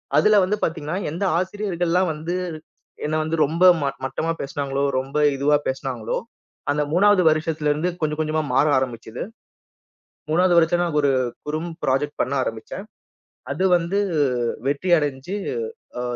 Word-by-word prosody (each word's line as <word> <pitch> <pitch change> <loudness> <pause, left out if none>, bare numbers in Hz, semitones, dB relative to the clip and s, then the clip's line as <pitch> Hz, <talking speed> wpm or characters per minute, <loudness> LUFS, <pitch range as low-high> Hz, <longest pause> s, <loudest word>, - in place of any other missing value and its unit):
அதுல 215 0 +5
வந்து 205 +3 0
பாத்தீங்கன்னா, 160 +1 -2
எந்த 170 +5 -3
ஆசிரியர்கள்லாம் 180 -2 0
வந்து, 160 +4 -4 0.7
என்ன 155 +1 -1
வந்து 160 +1 -1
ரொம்ப 165 +5 -1 0.2
மட் 140 -1 -2
மட்டமா 165 +4 -2
பேசினாங்களோ, 140 0 -2 0.2
ரொம்ப 135 +3 -4 0.2
இதுவா 145 +2 +3
பேசினாங்களோ. 130 -4 -2 0.5
அந்த 150 - +1
3வது 200 +1 +5
வருஷத்துலருந்து 155 +1 0
கொஞ்சம் 150 0 -1
கொஞ்சமா 155 0 0
மாற 145 - +4
ஆரம்பிச்சது. 120 -3 -4 1.1
3வது 175 +3 +3
வருஷம் 170 +1 +4
நாங்க 165 -3 -1
ஒரு 140 - +4 0.3
குறும் 155 +3 -3
பிராஜெக்ட் 145 +3 0
பண்ண 135 - -1
ஆரம்பிச்சேன். 115 - -6 0.7
அது 190 - -1
வந்து 175 +3 -1 0.7
வெற்றி 145 +6 0
அடைஞ்சு 145 +4 -3 0.6
அ - - -2
155 Hz, 130 wpm, -23 LUFS, 140-175 Hz, 1.1 s, அதுல